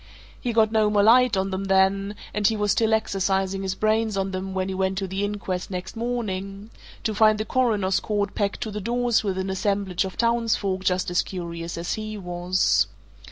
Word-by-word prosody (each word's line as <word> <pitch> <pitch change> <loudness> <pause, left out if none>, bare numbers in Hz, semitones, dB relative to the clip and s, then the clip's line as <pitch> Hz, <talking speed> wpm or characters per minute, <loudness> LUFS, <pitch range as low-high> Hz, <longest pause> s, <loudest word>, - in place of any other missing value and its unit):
He 245 - -1
got 220 -1 +3
no 215 -1 +3
more 205 -1 +3
light 245 0 +5
on 190 +1 -1
them 190 +1 -3
then, 195 +1 +2 0.2
and 210 -1 +2
he 220 - +1
was 210 -1 +1
still 225 +2 +2
exercising 195 -3 0
his 190 -1 -2
brains 215 -1 +1
on 195 0 -1
them 190 0 -4
when 185 0 -1
he 190 - -3
went 190 0 -1
to 195 0 -2
the 190 +2 -3
inquest 200 -3 -3
next 185 +2 -5
morning 210 -3 -4 0.3
to 220 - 0
find 215 0 +4
the 215 - -2
Coroner's 210 -6 +1
court 205 -2 -2
packed 200 -1 -2
to 220 - -3
the 210 0 -4
doors 240 +2 +1
with 195 -3 -2
an 190 0 -2
assemblage 195 -1 0
of 190 -1 -6
townsfolk 225 -5 +1
just 180 0 0
as 175 - +3
curious 170 -2 -6
as 170 +1 -2
he 215 0 -5
was. 180 0 +1
195 Hz, 205 wpm, -24 LUFS, 190-215 Hz, 0.3 s, light